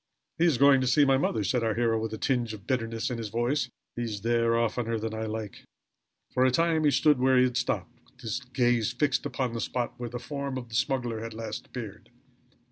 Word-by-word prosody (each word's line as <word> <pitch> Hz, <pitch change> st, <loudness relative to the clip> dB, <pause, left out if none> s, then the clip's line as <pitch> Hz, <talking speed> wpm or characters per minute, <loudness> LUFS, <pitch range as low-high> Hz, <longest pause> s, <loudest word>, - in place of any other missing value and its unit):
"He 170 Hz, -, +4 dB
is 160 Hz, -7 st, +3 dB
going 140 Hz, 0 st, +6 dB
to 130 Hz, -, 0 dB
see 145 Hz, +3 st, +5 dB
my 135 Hz, -1 st, +4 dB
mother," 110 Hz, -5 st, 0 dB
said 115 Hz, +6 st, 0 dB
our 110 Hz, -1 st, 0 dB
hero, 115 Hz, -1 st, +1 dB
with 110 Hz, -, -3 dB
a 110 Hz, -, -4 dB
tinge 120 Hz, -3 st, 0 dB
of 100 Hz, -, -14 dB
bitterness 115 Hz, -2 st, -1 dB
in 120 Hz, -, -3 dB
his 110 Hz, -2 st, -4 dB
voice. 125 Hz, +4 st, 0 dB, 0.3 s
"He 120 Hz, -, -3 dB
is 110 Hz, -4 st, -3 dB
there 115 Hz, +1 st, +2 dB
oftener 115 Hz, 0 st, 0 dB
than 110 Hz, 0 st, -4 dB
I 110 Hz, 0 st, -3 dB
like." 110 Hz, -2 st, -6 dB, 0.7 s
For 125 Hz, -, +3 dB
a 130 Hz, -, +5 dB
time 160 Hz, +3 st, +2 dB
he -, -, +6 dB
stood 145 Hz, 0 st, +3 dB
where 130 Hz, 0 st, +4 dB
he 125 Hz, -, +6 dB
had 125 Hz, -1 st, 0 dB
stopped, 125 Hz, -1 st, -2 dB
with -, -, -22 dB
his 115 Hz, +1 st, -2 dB
gaze 125 Hz, -3 st, +1 dB
fixed 145 Hz, +3 st, 0 dB
upon 130 Hz, -3 st, -2 dB
the 115 Hz, -, -3 dB
spot 125 Hz, -2 st, -2 dB
where 120 Hz, -1 st, -4 dB
the 120 Hz, -, -5 dB
form 140 Hz, +1 st, -4 dB
of 120 Hz, -2 st, -7 dB
the 115 Hz, -, -7 dB
smuggler 125 Hz, -2 st, 0 dB
had 115 Hz, 0 st, -6 dB
last 115 Hz, 0 st, -6 dB
appeared. 110 Hz, -5 st, -8 dB
120 Hz, 235 wpm, -28 LUFS, 115-130 Hz, 0.7 s, going